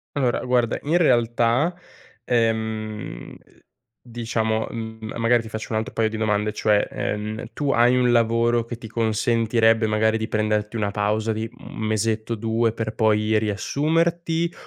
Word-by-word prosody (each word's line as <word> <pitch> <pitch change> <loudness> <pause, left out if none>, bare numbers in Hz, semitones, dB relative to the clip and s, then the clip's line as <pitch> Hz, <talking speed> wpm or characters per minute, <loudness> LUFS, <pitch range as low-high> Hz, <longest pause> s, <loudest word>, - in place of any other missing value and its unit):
Allora, 125 -4 0
guarda, 125 -2 +1
in 160 +4 +2
realtà 120 +2 +2 0.5
ehm, 110 - -2
uhm - - -13 0.7
diciamo, 115 -2 -2
mhmm, 110 -1 -6
magari 115 +1 +3
ti - - -9
faccio 110 0 -6
un 110 - +1
altro 110 - -5
paio 110 -1 +1
di 110 - -5
domande, 105 -1 0
cioè, 105 -1 +2
ehm, 105 +2 -3
tu 145 +1 -1
hai 120 +1 +4
un 125 -1 +3
lavoro 115 0 +2
che 115 0 -6
ti 115 -1 -10
consentirebbe 115 0 +2
magari 110 +1 +2
di 110 - -3
prenderti 105 0 -1
una 105 -2 -1
pausa 105 +2 0
di, 110 +1 -3
mhmm, 125 - -15
1 - - -9
mesetto, 110 +1 -1
2, 115 +1 0
per 110 -1 -4
poi 110 0 +2
riassumerti? 165 - 0
115 Hz, 155 wpm, -23 LUFS, 110-120 Hz, 0.7 s, hai